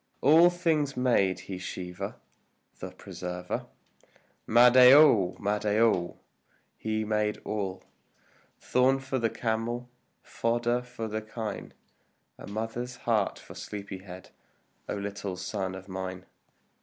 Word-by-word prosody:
All 160 +5 +7
things 160 -6 0
made 100 -8 +2
he 95 -1 -7
Shiva 90 +1 -6 0.6
the - - -6
Preserver. 90 0 -6 0.8
Mahadeo! 125 -3 +7
Mahadeo! 105 -2 +1 0.6
He 110 0 -2
made 105 0 0
all, 95 -3 -3 0.8
Thorn 130 +2 +3
for 135 0 -3
the 115 -1 +1
camel, 120 +2 -3 0.3
fodder 120 +1 0
for 125 -2 -6
the 110 0 -3
kine, 110 -1 -6 0.6
And - - -9
mother's 115 +3 -4
heart 110 -4 +1
for - - -12
sleepy 100 -2 -7
head, 95 -1 -11 0.6
O - - -1
little 100 -2 -5
son 95 0 -3
of 95 0 -10
mine! 95 -1 -6
110 Hz, 110 wpm, -28 LUFS, 95-125 Hz, 0.8 s, All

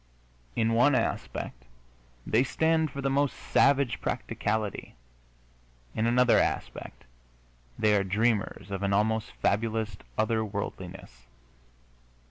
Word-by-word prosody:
In 115 0 +2
one 130 +5 +4
aspect - - -3 0.6
they 115 +4 +3
stand 160 +3 +1
for 140 +1 -6
the 135 - 0
most 140 0 +1
savage 140 -3 +2
practicality; 105 -1 -2 1.0
in 110 - 0
another 125 +1 +5
aspect - - -3 0.7
they 105 -1 +3
are 100 - +2
dreamers 105 +1 0
of 95 -1 -3
an 100 0 0
almost 110 +2 +1
fabulous 110 -1 0 0.2
other 110 +1 +1
worldiness. 95 - -7
110 Hz, 105 wpm, -28 LUFS, 100-125 Hz, 1.0 s, another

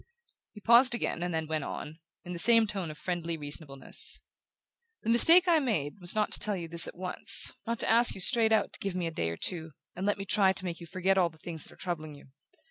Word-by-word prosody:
He 210 - -12
paused 240 +4 +5
again, 230 - -3
and 175 0 -2
then 160 -1 -2
went 155 -1 -3
on, 155 +3 -8 0.2
in 180 - -8
the 170 - -6
same 230 +3 +4
tone 195 -5 -4
of 155 - -9
friendly 170 -2 -4
reasonableness: 145 -2 -6 0.8
"The 225 - 0
mistake 335 +10 +6
I 335 -2 +4
made 205 - -3
was 175 +1 -2
not 215 -1 0
to - - 0
tell 210 -1 -1
you 170 -3 -6
this 165 0 +3
at - - -10
once 180 0 +2
not 230 0 -2
to - - -1
ask 235 +2 +5
you - - -9
straight 225 +4 +3
out 220 -1 +1
to - - -7
give 195 -2 -4
me 180 -2 -2
a 165 - -3
day 85 - -3
or 85 - -6
two, 160 -4 -2 0.2
and 185 +3 -4
let 205 - +1
me 195 - -6
try 195 -1 +4
to 190 - -1
make 170 -2 -5
you 170 - -11
forget 185 +2 0
all 175 -2 +2
the 160 - -20
things 160 -1 -9
that - - -15
are - - -11
troubling 155 -4 -5
you. 140 - -17
180 Hz, 255 wpm, -29 LUFS, 160-215 Hz, 0.8 s, mistake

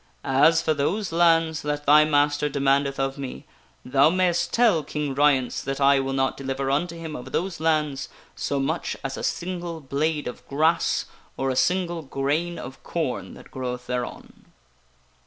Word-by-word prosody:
As 160 +5 +4
for 155 - +2
those 175 +8 -1
lands 165 -1 +3
that 145 0 -3
thy 150 +2 +7
master 145 0 +2
demandeth 140 0 +1
of 135 +1 -1
me, 130 - -6 0.4
thou 135 +3 +4
mayst 180 0 +1
tell 225 -10 +3
King 145 -1 -3
Ryence 135 -3 +2
that 135 +1 -4
I 140 0 +5
will 135 0 -2
not 135 0 0
deliver 135 0 -3
unto 170 +4 0
him 160 -2 -6
of 125 - -8
those 180 -1 -2
lands 150 -4 0 0.3
so 140 - -2
much 155 +5 -2
as 135 0 -3
a - - -6
single 175 -2 -3
blade 150 +2 -1
of 125 - -7
grass, 155 +4 +1 0.3
or 135 0 0
a - - -2
single 175 +3 +1
grain 150 +5 -2
of 130 +2 -9
corn 160 -7 -3
that - - -15
groweth 125 -1 -5
thereon." 125 -1 -5
145 Hz, 165 wpm, -24 LUFS, 135-165 Hz, 0.4 s, thy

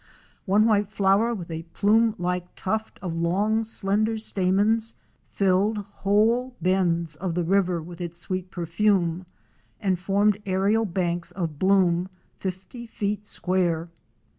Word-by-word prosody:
One 205 +3 +4
white 210 -3 +2
flower 205 +2 +2
with 175 -5 -7
a 160 0 -4
plume 210 +6 +2
like 180 0 -3
tuft 220 +3 -3
of 175 -3 -3
long 205 +6 +1
slender 215 +1 0
stamens, 215 +2 +1 0.3
filled 200 +2 +2
whole 210 +5 +1
bends 170 -4 +1
of 175 +1 -3
the 175 - 0
river 180 -2 +1
with 175 +1 -10
its 170 -1 -5
sweet 185 +1 -4
perfume 175 0 0 0.5
and 190 -4 0
formed 205 +2 +1
aérial 200 +2 +1
banks 175 -1 -1
of 165 -6 -4
bloom 185 -2 +3 0.3
fifty 190 +6 -6
feet 210 -1 -3
square. 175 -3 0
190 Hz, 130 wpm, -25 LUFS, 175-210 Hz, 0.5 s, One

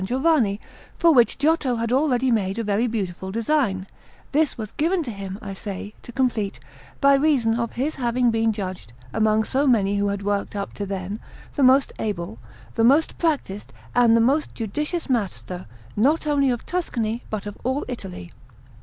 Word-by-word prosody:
Giovanni, 250 -2 +2 0.4
for 335 -1 +5
which 240 -4 +4
Giotto 290 -3 +2
had 230 0 -2
already 260 -2 +2
made 195 -3 0
a 230 - -1
very 210 +3 +1
beautiful 190 -4 -3
design; 230 -4 0 0.5
this 300 -1 +2
was 215 -2 -5
given 340 +3 +1
to 245 - -5
him, 195 -2 -6
I 200 -1 -5
say, 200 +1 -6
to - - -10
complete, 225 - 0 0.4
by 280 0 +6
reason 275 -5 +3
of 235 -1 -2
his 280 +6 -1
having 245 -1 +1
been 225 0 +2
judged, 185 - -6 0.2
among 220 0 +3
so 275 +6 +1
many 205 -5 +3
who 205 - +1
had 200 0 -2
worked 205 0 -1
up 200 -1 -4
to 200 - -5
then, 195 +2 -4 0.4
the 285 - 0
most 265 +1 +5
able, 170 - -3 0.3
the 225 - +1
most 280 +7 +4
practised 285 - -1 0.2
and 235 -2 +5
the - - +4
most 280 +6 +1
judicious 300 - -3
master 195 - -2 0.3
not 285 +10 +2
only 285 -2 +2
of 240 -2 -2
Tuscany 235 -10 -2
but 215 -2 -4
of 205 0 -6
all 260 +4 -1
Italy. 190 - -7
230 Hz, 175 wpm, -23 LUFS, 200-275 Hz, 0.5 s, by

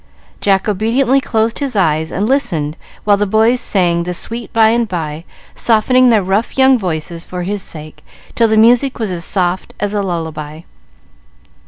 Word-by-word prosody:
Jack 195 0 +1
obediently 235 +6 +1
closed 225 -2 -1
his 275 -5 -3
eyes 160 -4 +1
and 200 +3 -1
listened 165 - -1 0.3
while 205 -1 +3
the 205 0 0
boys 220 +5 +3
sang 175 -6 +1
"The 180 +1 -4
Sweet 230 +5 -6
By 220 -1 +4
and 235 0 +1
By," 165 -3 -5 0.3
softening 250 +3 +3
their 220 -4 +3
rough 195 +7 -1
young 265 0 +5
voices 170 -5 -4
for 180 -1 -6
his 200 +2 -3
sake 155 -3 -10 0.3
till 230 - +3
the 220 0 +1
music 245 +4 +4
was 220 -5 -3
as 170 -2 -4
soft 185 -1 -2
as 205 +1 -2
a 205 - 0
lullaby. 160 -4 -5
205 Hz, 170 wpm, -15 LUFS, 175-230 Hz, 0.3 s, young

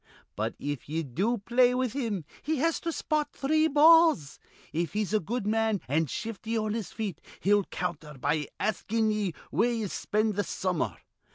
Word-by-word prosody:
But, 110 +2 -2
if 145 -2 -5
ye 165 +2 -1
do 190 - 0
play 245 +4 +3
with 255 -3 0
him, 220 - -2 0.2
he 315 +2 -1
has 330 +4 +1
to 335 - -2
spot 305 -2 0
three 310 +3 +2
balls. 315 - +5 0.3
If 170 +2 -1
he's 210 0 -1
a 215 - +4
good 215 +5 -3
man 220 -1 +1
an' 155 +4 +1
shifty 225 - -4
on 215 -1 -1
his 225 -4 -4
feet, 215 -5 -4 0.2
he'll 205 0 +3
counter 160 -4 -5
be 145 +3 0
askin' 220 +1 0
ye 205 -5 -1 0.2
where 240 +2 +2
ye 225 -2 -1
spend 210 +2 -1
th' 205 - +1
summer. 180 -2 -1
215 Hz, 175 wpm, -28 LUFS, 175-245 Hz, 0.3 s, balls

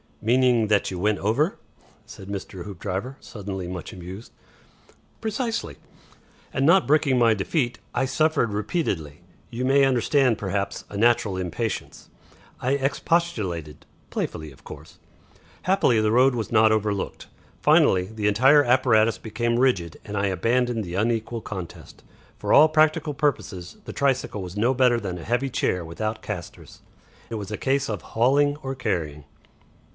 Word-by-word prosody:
"Meaning, 120 -1 +3
that 105 -1 +2
you 90 - -4
went 105 +3 +1
over?" 130 - +1 0.5
said 95 - -11
Mr. 95 -2 -6
Hoopdriver, 100 - -5
suddenly 95 -4 -6
much 90 -1 -6
amused. 95 +4 -9 0.9
"Precisely. 225 +1 -3 0.8
And 135 - 0
not 180 +5 +5
brooking 145 -3 +3
my 115 -2 +5
defeat, 120 - -1 0.2
I - - +1
suffered 155 -4 +1
repeatedly. 100 - -2 0.3
You 120 +1 -4
may 135 +1 +4
understand, 130 -1 +2
perhaps, 100 0 -3
a 100 - -6
natural 110 -3 +2
impatience. 95 +5 -4 0.5
I 130 +2 0
expostulated 135 - -1 0.3
playfully, 80 -1 -4
of 65 - -19
course. - - -12 0.6
Happily 185 - +3
the 110 0 +2
road 130 +3 +5
was 115 -2 -3
not 110 -1 +5
overlooked. 105 -2 -2 0.3
Finally, 90 -1 +4
the 105 +1 -3
entire 135 +8 +5
apparatus 120 -3 +3
became 120 +2 -1
rigid, 95 -11 +1
and 105 - -6
I 100 0 +1
abandoned 115 +4 0
the 90 -2 -6
unequal 115 +2 -1
contest. 95 -6 -9 0.3
For - - -1
all 155 +2 +8
practical 155 -1 +2
purposes 110 -11 -2
the - - -7
tricycle 130 -6 0
was 90 +2 -8
no 120 +5 +2
better 125 -2 +3
than 95 -5 -5
a 85 - -8
heavy 125 +4 0
chair 90 -8 -1
without 110 +7 -4
castors. - - -8 0.5
It - - -3
was 105 -2 -6
a 105 - -3
case 135 +1 0
of 105 -4 -3
hauling 140 +5 +3
or 135 -3 -5
carrying." 80 - -3
115 Hz, 145 wpm, -24 LUFS, 100-135 Hz, 0.9 s, all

